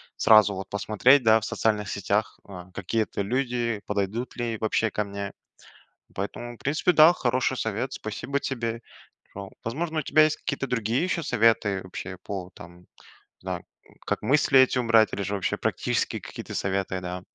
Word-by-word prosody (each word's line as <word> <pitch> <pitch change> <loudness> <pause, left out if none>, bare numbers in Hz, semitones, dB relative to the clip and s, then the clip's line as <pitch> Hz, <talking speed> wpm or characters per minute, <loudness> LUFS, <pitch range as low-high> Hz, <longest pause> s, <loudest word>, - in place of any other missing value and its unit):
сразу 110 -2 +6
вот 95 0 -7
посмотреть, 115 +6 +3
да, 110 0 +5
в 110 - -6
социальных 105 -4 0
сетях, 100 +2 -1
а, 90 -2 -10
какие 100 +4 -1
это 100 - -5
люди, 120 -2 -1
подойдут 105 +4 -2
ли 120 -2 -3
вообще 110 0 0
ко 105 - -1
мне. 100 0 -5 0.8
Поэтому, 120 +5 -5
в - - -20
принципе, 150 +5 +1
да, 160 0 +7
хороший 130 -3 0
совет, 110 +4 -2
спасибо 120 +6 -3
тебе. 115 -3 -3 0.5
О, 100 -1 -7
возможно, 155 +7 -3
у - - 0
тебя 155 - +4
есть 155 0 +2
какие-то 135 -1 -4
другие 115 +2 0
еще 180 -2 -1
советы, 110 -5 +2
вообще, 95 0 -7
по 95 -3 -6
там, 85 +1 -13
не - - -25 0.6
знаю, - - -5 0.4
как - - -1
мысли 135 -1 +4
эти 130 0 +4
убрать 115 -2 +4
или 100 - -2
же, 100 +2 -2
вообще, 95 - -1
практические - - -1
какие-то - - -8
советы, 95 -1 -1
да. 90 0 -5
110 Hz, 170 wpm, -26 LUFS, 100-125 Hz, 0.8 s, да